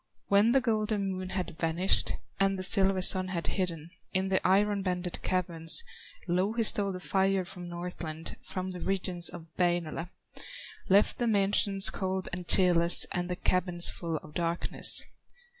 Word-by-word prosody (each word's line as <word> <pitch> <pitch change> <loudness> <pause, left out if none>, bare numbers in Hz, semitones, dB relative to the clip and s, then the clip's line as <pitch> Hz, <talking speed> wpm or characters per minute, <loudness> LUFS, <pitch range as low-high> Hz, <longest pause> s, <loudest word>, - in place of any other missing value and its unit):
When 205 +3 +3
the 270 +1 +3
golden 215 -4 -2
Moon 185 0 -6
had 180 -3 -5
vanished, 170 +3 +1 0.3
And 195 0 +1
the 185 - -5
silver 190 -1 +4
Sun 185 0 +6
had 175 -3 -4
hidden 170 -4 -4 0.2
In 190 0 -1
the 190 - 0
iron 200 +1 +1
banded 180 -2 -4
caverns, 170 - +3 0.4
Louhi 195 +7 -1
stole 205 -2 +3
the 185 - -7
fire 190 +3 -1
from 175 0 -10
Northland, 170 -2 -7
From 185 0 -6
the 180 - -7
regions 180 -2 -1
of 160 - -11
Wainola, 175 -1 -1 0.8
Left 200 +2 +2
the 240 - -1
mansions 200 -1 +2
cold 190 -1 -4
and 175 0 -6
cheerless, 175 -2 +5
And 175 -1 -3
the 180 - -2
cabins 180 -1 +1
full 165 -2 -5
of 150 - -14
darkness. 170 0 +1
185 Hz, 155 wpm, -28 LUFS, 175-195 Hz, 0.8 s, Sun